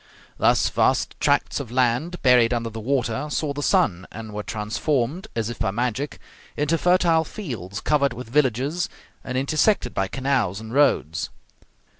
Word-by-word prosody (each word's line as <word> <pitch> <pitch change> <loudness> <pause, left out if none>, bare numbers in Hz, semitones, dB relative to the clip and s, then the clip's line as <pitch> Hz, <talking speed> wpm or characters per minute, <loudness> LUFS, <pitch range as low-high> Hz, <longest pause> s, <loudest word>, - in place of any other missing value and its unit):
Thus - - +4
vast - - +1
tracts - - +1
of - - -6
land 130 +8 +1
buried 125 -2 +5
under 115 -1 -3
the 110 - -6
water 130 +2 -1
saw 145 -1 -1
the 145 - -4
sun, 125 - +2
and 110 -1 -8
were 105 - -3
transformed, 120 - -2
as 115 0 -1
if 120 - -9
by - - +1
magic, 125 +6 -2 0.4
into 150 +3 +1
fertile 175 -2 +3
fields, 115 - -6
covered 140 -1 +2
with 125 0 -8
villages, 140 +5 +1 0.3
and 130 0 -3
intersected 155 +10 +1
by 95 - 0
canals 130 -7 0
and 110 +1 -8
roads. 80 - +2
125 Hz, 155 wpm, -23 LUFS, 110-150 Hz, 0.4 s, buried